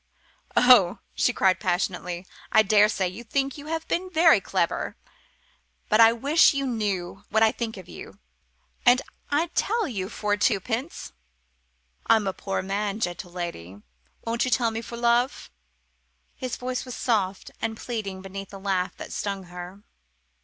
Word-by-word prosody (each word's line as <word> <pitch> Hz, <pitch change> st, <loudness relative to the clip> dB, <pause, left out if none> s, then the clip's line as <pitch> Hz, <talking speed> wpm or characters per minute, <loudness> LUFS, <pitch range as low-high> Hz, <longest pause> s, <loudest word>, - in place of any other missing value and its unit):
"Oh," 245 Hz, -8 st, +6 dB, 0.2 s
she -, -, +2 dB
cried 190 Hz, -6 st, +2 dB
passionately, 180 Hz, -1 st, -2 dB, 0.3 s
"I 220 Hz, -, +6 dB
daresay 210 Hz, -2 st, +3 dB
you 190 Hz, +6 st, -8 dB
think 270 Hz, +3 st, -1 dB
you've 315 Hz, +2 st, -5 dB
been 370 Hz, +2 st, -1 dB
very 330 Hz, -1 st, +5 dB
clever. -, -, -1 dB, 0.9 s
But 215 Hz, +1 st, +5 dB
I 225 Hz, 0 st, +8 dB
wish 285 Hz, +6 st, +4 dB
you 275 Hz, 0 st, 0 dB
knew 200 Hz, -6 st, -2 dB
what 220 Hz, 0 st, +3 dB
I 220 Hz, -, +5 dB
think 225 Hz, -3 st, -4 dB
of 185 Hz, -2 st, -10 dB
you. -, -, -11 dB, 0.7 s
And 245 Hz, +1 st, +5 dB, 0.3 s
I'd 320 Hz, +4 st, 0 dB
tell 450 Hz, -2 st, +1 dB
you 195 Hz, -7 st, -4 dB
for 210 Hz, -2 st, -1 dB
twopence." 225 Hz, -, -1 dB, 0.9 s
"I'm 220 Hz, -2 st, +4 dB
a 190 Hz, -, -1 dB
poor 195 Hz, 0 st, -3 dB
man, 200 Hz, +2 st, -2 dB
gentle 175 Hz, -3 st, -3 dB
lady 100 Hz, -, -6 dB, 0.5 s
won't 230 Hz, +1 st, 0 dB
you 255 Hz, -, 0 dB
tell 235 Hz, -1 st, +2 dB
me 225 Hz, 0 st, -4 dB
for 235 Hz, +1 st, -8 dB
love?" 240 Hz, +2 st, +1 dB, 0.8 s
His 255 Hz, -3 st, -4 dB
voice 250 Hz, 0 st, -3 dB
was 250 Hz, -2 st, -7 dB
soft 200 Hz, -5 st, -1 dB
and 220 Hz, 0 st, -2 dB
pleading 200 Hz, -6 st, -5 dB
beneath 195 Hz, 0 st, -7 dB
the 195 Hz, -, -10 dB
laugh 190 Hz, -2 st, -1 dB
that -, -, -8 dB
stung 195 Hz, -2 st, -3 dB
her. 180 Hz, +3 st, -9 dB
220 Hz, 155 wpm, -25 LUFS, 190-250 Hz, 0.9 s, I